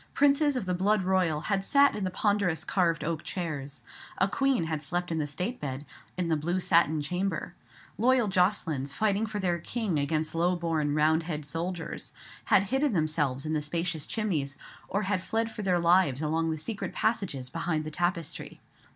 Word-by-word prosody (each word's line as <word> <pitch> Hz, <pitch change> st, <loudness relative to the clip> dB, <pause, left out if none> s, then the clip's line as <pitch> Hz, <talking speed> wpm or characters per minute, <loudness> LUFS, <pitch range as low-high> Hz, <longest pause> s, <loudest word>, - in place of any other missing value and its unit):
Princes 285 Hz, 0 st, +4 dB
of 250 Hz, -, -2 dB
the 180 Hz, -, 0 dB
blood 195 Hz, +2 st, +2 dB
royal 180 Hz, -5 st, +1 dB
had 195 Hz, +1 st, 0 dB
sat 280 Hz, +6 st, +5 dB
in 210 Hz, -, -3 dB
the 185 Hz, -, 0 dB
ponderous 185 Hz, -4 st, +1 dB
carved 170 Hz, -4 st, +1 dB
oak 160 Hz, 0 st, -2 dB
chairs. 145 Hz, -7 st, -5 dB, 0.3 s
A -, -, +3 dB
queen 270 Hz, -7 st, +1 dB
had 160 Hz, -2 st, -2 dB
slept 175 Hz, +3 st, -2 dB
in 160 Hz, -, 0 dB
the 150 Hz, -, -1 dB
state 180 Hz, -, -4 dB
bed, 135 Hz, 0 st, -4 dB, 0.3 s
in 180 Hz, -2 st, 0 dB
the 165 Hz, -, +2 dB
blue 170 Hz, +5 st, -1 dB
satin 160 Hz, -4 st, +3 dB
chamber. 180 Hz, +3 st, -2 dB, 0.5 s
Loyal 245 Hz, 0 st, +4 dB
Jocelyns, 180 Hz, -8 st, +1 dB
fighting 215 Hz, +4 st, +1 dB
for 215 Hz, -1 st, -4 dB
their 180 Hz, -3 st, 0 dB
king 195 Hz, -3 st, -1 dB
against 155 Hz, +2 st, 0 dB
low 175 Hz, +2 st, +2 dB
born 160 Hz, -4 st, 0 dB
Roundhead 155 Hz, 0 st, +1 dB
soldiers, 165 Hz, +3 st, -4 dB, 0.3 s
had 195 Hz, -, +5 dB
hidden 270 Hz, -1 st, +2 dB
themselves 155 Hz, -5 st, 0 dB
in 155 Hz, -, -1 dB
the 155 Hz, -, +1 dB
spacious 165 Hz, 0 st, -2 dB
chimneys, 155 Hz, -11 st, -1 dB, 0.3 s
or 200 Hz, +3 st, 0 dB
had 190 Hz, -1 st, 0 dB
fled 225 Hz, +3 st, -1 dB
for 215 Hz, -, -6 dB
their 185 Hz, -3 st, +2 dB
lives 170 Hz, -5 st, +3 dB
along 160 Hz, +2 st, 0 dB
the 160 Hz, -, -1 dB
secret 200 Hz, +6 st, -5 dB
passages 175 Hz, -, -1 dB
behind 165 Hz, -1 st, -1 dB
the 155 Hz, -, -6 dB
tapestry. 170 Hz, -2 st, -2 dB
175 Hz, 180 wpm, -28 LUFS, 155-200 Hz, 0.5 s, sat